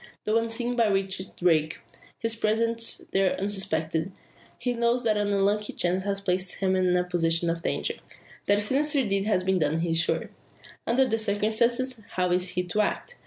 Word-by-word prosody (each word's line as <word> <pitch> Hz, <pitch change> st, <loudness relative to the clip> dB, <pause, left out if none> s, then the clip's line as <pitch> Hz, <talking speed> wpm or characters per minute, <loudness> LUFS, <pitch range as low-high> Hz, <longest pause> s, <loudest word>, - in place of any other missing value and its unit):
Though 215 Hz, +2 st, +2 dB
unseen 235 Hz, +2 st, -2 dB
by 230 Hz, -2 st, +3 dB
Richard 195 Hz, -1 st, -1 dB
Darke 160 Hz, -3 st, +2 dB, 0.4 s
his 230 Hz, -1 st, -1 dB
presence 230 Hz, +1 st, 0 dB
there 195 Hz, -1 st, +1 dB
unsuspected 165 Hz, -4 st, -2 dB, 0.5 s
he 245 Hz, -, -1 dB
knows 235 Hz, +1 st, +1 dB
that 220 Hz, -2 st, +2 dB
an 205 Hz, 0 st, 0 dB
unlucky 205 Hz, +1 st, +1 dB
chance 185 Hz, +2 st, 0 dB
has 200 Hz, -1 st, -1 dB
placed 185 Hz, -1 st, -1 dB
him 190 Hz, -1 st, +1 dB
in 180 Hz, -1 st, +2 dB
a 180 Hz, -, +2 dB
position 170 Hz, -1 st, 0 dB
of 165 Hz, 0 st, -4 dB
danger. -, -, -1 dB, 0.5 s
That 205 Hz, -, +4 dB
a -, -, +1 dB
sinister 275 Hz, +3 st, +1 dB
deed 195 Hz, 0 st, 0 dB
has 210 Hz, -4 st, +1 dB
been 190 Hz, 0 st, +1 dB
done 155 Hz, +1 st, +1 dB
he 170 Hz, -1 st, -1 dB
is 165 Hz, -, +2 dB
sure. -, -, 0 dB, 0.6 s
Under 260 Hz, +3 st, +3 dB
the 225 Hz, -2 st, 0 dB
circumstances, 220 Hz, +4 st, +1 dB
how 180 Hz, -1 st, 0 dB
is 180 Hz, +1 st, +2 dB
he 180 Hz, -, -1 dB
to 180 Hz, +4 st, 0 dB
act? 485 Hz, -, -3 dB
200 Hz, 185 wpm, -26 LUFS, 180-225 Hz, 0.6 s, That